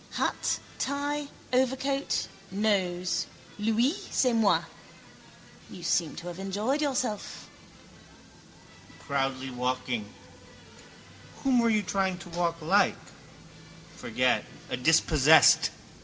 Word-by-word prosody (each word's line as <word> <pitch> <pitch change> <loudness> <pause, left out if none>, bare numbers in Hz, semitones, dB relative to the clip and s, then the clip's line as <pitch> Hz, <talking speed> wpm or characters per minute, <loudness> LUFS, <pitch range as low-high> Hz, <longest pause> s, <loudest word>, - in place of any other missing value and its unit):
Hat, - - -1 0.2
tie, 285 +1 -2 0.3
overcoat, 265 +2 0 0.2
nose. 190 -3 0 0.3
Lui, 225 +5 +2 0.2
c'est 255 -2 +2
moi. 225 -3 +3 1.1
You 180 - -10
seem 165 -2 0
to 170 - -8
have 175 +1 -7
enjoyed 210 +9 -1
yourself. 255 -7 -2 1.5
Proudly 135 -1 -2
walking. 125 -3 -2 1.3
Whom 260 -2 +3
were 235 -1 +3
you 215 -2 +2
trying 190 +1 -1
to 175 0 -11
walk 170 -1 -1
like? 195 +5 +3 1.0
Forget: - - +1 0.3
a - - +1
dispossessed. 155 +2 +5
195 Hz, 95 wpm, -28 LUFS, 160-245 Hz, 1.5 s, dispossessed